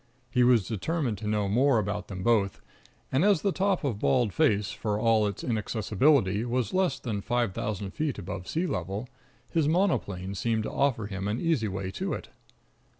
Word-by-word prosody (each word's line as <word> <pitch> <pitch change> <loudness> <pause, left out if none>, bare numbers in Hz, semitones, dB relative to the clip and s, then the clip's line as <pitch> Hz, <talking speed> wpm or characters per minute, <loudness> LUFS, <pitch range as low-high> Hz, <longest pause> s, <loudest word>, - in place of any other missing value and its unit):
He 125 -2 +3
was 120 -6 +4
determined 120 - -2
to 105 - -5
know 105 -1 +1
more 125 +5 +3
about 105 -1 -2
them 95 -3 -6
both; 105 -4 +2 0.5
and 135 +5 +2
as 200 -5 +3
the 200 - +2
top 195 -1 0
of 120 -8 -1
Bald 120 -3 +2
Face, 105 -10 +2
for 105 -2 -2
all 110 -2 +3
its 100 - -5
inaccessibility, 110 -1 +2
was 125 +3 -1
less 185 -7 +2
than 110 -7 -3
five 120 -2 0
thousand 100 -1 -3
feet 150 +4 -2
above 90 -1 -6
sea 165 +3 -1
level, 100 - -3 0.4
his 160 -3 +2
monoplane 100 - 0
seemed 110 +2 0
to - - -4
offer 135 -6 +1
him 100 -1 -4
an 105 +4 -1
easy 160 -10 +1
way 95 -1 -4
to - - -3
it. - - -6
110 Hz, 185 wpm, -28 LUFS, 100-140 Hz, 0.5 s, was